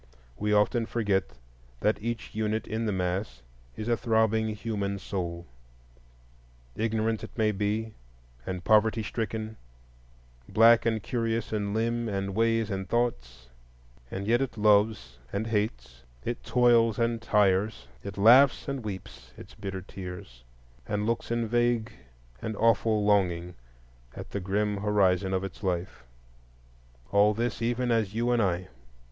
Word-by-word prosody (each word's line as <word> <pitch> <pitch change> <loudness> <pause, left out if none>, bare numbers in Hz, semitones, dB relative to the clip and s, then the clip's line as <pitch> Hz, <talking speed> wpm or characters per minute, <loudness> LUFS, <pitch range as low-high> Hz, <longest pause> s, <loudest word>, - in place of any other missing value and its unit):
We 105 +10 -2
often 110 +3 +2
forget 95 - -1 0.4
that 105 0 +1
each 115 0 -4
unit 110 +1 -1
in 110 +1 -2
the - - +1
mass 90 - -2 0.3
is 110 - -5
a 120 - +3
throbbing 110 -1 +1
human 105 -2 -3
soul. 85 -3 -4 1.3
Ignorant 110 0 -1
it - - -10
may 110 -1 +3
be, 105 +2 -2 0.5
and 90 -1 -5
poverty 110 +2 +3
stricken, 110 0 -4 0.9
black 115 +1 +6
and 110 -3 0
curious 115 -2 -2
in 105 -1 -1
limb 115 +1 0
and 100 -1 -2
ways 115 0 +1
and 95 -2 -4
thought; 65 - -2 0.6
and 100 +1 -5
yet 120 +4 +2
it 135 -4 -3
loves 105 - +2
and 100 +3 -2
hates, 65 - -2 0.2
it 120 +1 -3
toils 120 -3 +4
and 115 -1 0
tires, 100 - +1 0.2
it 100 0 -7
laughs 120 +7 +6
and 135 -3 -3
weeps 95 - -8
its - - -12
bitter 95 -2 -6
tears, 90 -11 -9 0.4
and 105 0 -1
looks 115 +1 -1
in 115 -1 0
vague 120 -1 +1 0.5
and 110 - -4
awful 110 -1 +2
longing 90 -4 +1 0.6
at - - -9
the 100 - -2
grim 100 +2 -1
horizon 100 -2 +2
of 95 0 0
its 95 -2 -7
life,—all - - -3
this, 115 0 -2
even 120 +1 0
as 110 -3 0
you 120 +2 +1
and 120 -1 +3
I. 90 -2 0
105 Hz, 140 wpm, -28 LUFS, 95-115 Hz, 1.3 s, black